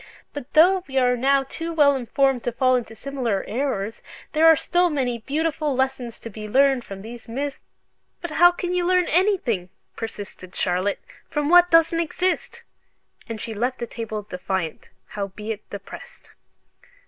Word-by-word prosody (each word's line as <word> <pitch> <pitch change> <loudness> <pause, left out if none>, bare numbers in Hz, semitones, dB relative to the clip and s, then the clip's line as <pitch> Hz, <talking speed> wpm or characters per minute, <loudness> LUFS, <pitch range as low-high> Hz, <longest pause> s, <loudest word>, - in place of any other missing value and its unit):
But 290 -2 -8
though 360 +4 +5
we 270 -1 -4
are 250 -1 +4
now 270 +2 +3
too 330 +5 -5
well 290 -3 +4
informed 265 0 +1
to 245 - 0
fall 255 +2 +3
into 230 -3 -3
similar 245 -5 -2
errors, 225 -3 -2 0.3
there 315 +1 +4
are 325 - +8
still 350 +3 +1
many 255 -6 -1
beautiful 300 +2 -1
lessons 260 -3 -2
to 230 - -7
be 215 +1 -7
learned 270 +1 +3
from 195 -2 -9
these 235 +2 -10
myths 275 +4 -4 0.3
" - - -48
"But 345 - -6
how 350 +3 +6
can 355 0 -4
you 360 -1 +1
learn 365 0 +3
anything," 320 - +1 0.3
persisted 205 -5 -8
Charlotte, 185 +2 0 0.3
"from 295 -1 -1
what 355 +1 +7
doesn't 330 0 +4
exist?" 370 +7 -2 0.7
And 225 -1 -5
she 225 - -5
left 245 +4 -1
the 235 - -4
table 220 -2 -5
defiant, 180 -4 -4 0.2
howbeit 210 +1 -6
depressed. 200 -1 -10
260 Hz, 160 wpm, -23 LUFS, 220-315 Hz, 0.7 s, are